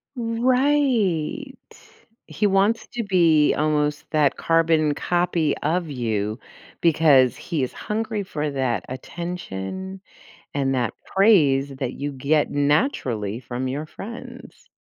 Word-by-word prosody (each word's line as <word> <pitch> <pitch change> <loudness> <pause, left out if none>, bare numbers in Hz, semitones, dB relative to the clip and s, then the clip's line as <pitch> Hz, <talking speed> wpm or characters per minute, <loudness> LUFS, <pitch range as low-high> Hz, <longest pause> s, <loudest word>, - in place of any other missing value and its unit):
Right, 250 - +1 0.7
he 210 - 0
wants 200 +4 +2
to 240 - -2
be 170 -7 +4
almost 150 -1 0
that 150 -3 +2
carbon 165 -2 +2
copy 175 -3 0
of 165 +2 -1
you 110 -4 -2 0.4
because 145 -6 +4
he 160 -6 -3
is 130 - -4
hungry 220 -1 -3
for 150 -5 -3
that 130 -7 -1
attention 175 - -6 0.5
and 135 -1 0
that 125 -2 -1
praise 155 -10 +4
that 130 -2 -4
you 145 +1 -4
get 140 +3 +1
naturally 140 - 0
from 125 +1 -4
your 140 +4 -3
friends. 230 +9 -10
155 Hz, 115 wpm, -23 LUFS, 135-195 Hz, 0.7 s, be